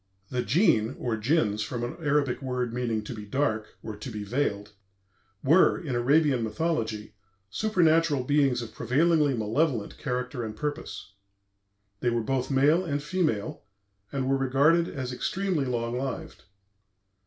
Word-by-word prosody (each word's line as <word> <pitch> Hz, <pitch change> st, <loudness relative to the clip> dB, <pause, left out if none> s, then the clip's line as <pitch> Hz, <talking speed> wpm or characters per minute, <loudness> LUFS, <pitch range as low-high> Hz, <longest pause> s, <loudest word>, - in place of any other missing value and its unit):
The 125 Hz, -, 0 dB
Djinns 120 Hz, -, +2 dB
(or 120 Hz, -2 st, -1 dB
Jinns, 110 Hz, -2 st, +1 dB
from 120 Hz, +3 st, -3 dB
an 120 Hz, -, -4 dB
Arabic 145 Hz, -4 st, +1 dB
word 125 Hz, -3 st, -2 dB
meaning 115 Hz, -3 st, -1 dB
"to 105 Hz, -, -6 dB
be 110 Hz, -2 st, -7 dB
dark" 110 Hz, -1 st, -1 dB
or 110 Hz, -1 st, -6 dB
"to 105 Hz, +5 st, -7 dB
be 105 Hz, -3 st, -5 dB
veiled") 105 Hz, -3 st, -2 dB, 0.7 s
were, 160 Hz, +7 st, +5 dB
in 145 Hz, -7 st, -4 dB
Arabian 140 Hz, +1 st, +3 dB
mythology, 110 Hz, -5 st, -2 dB, 0.4 s
supernatural 165 Hz, -, +2 dB
beings 135 Hz, -3 st, +2 dB
of 115 Hz, -, -10 dB
prevailingly 150 Hz, +1 st, +2 dB
malevolent 115 Hz, +1 st, 0 dB
character 125 Hz, -2 st, -3 dB
and 110 Hz, -1 st, -5 dB
purpose. 145 Hz, -8 st, -5 dB, 0.9 s
They 120 Hz, -, +1 dB
were 120 Hz, -1 st, 0 dB
both 130 Hz, +2 st, -1 dB
male 145 Hz, +6 st, +4 dB
and 145 Hz, -4 st, -2 dB
female, 155 Hz, -, -1 dB, 0.5 s
and 135 Hz, -2 st, -2 dB
were 135 Hz, 0 st, +2 dB
regarded 140 Hz, +6 st, +3 dB
as 130 Hz, -2 st, -5 dB
extremely 185 Hz, +1 st, -1 dB
long 120 Hz, -1 st, -2 dB
lived. 130 Hz, -2 st, -5 dB
130 Hz, 140 wpm, -27 LUFS, 115-150 Hz, 0.9 s, were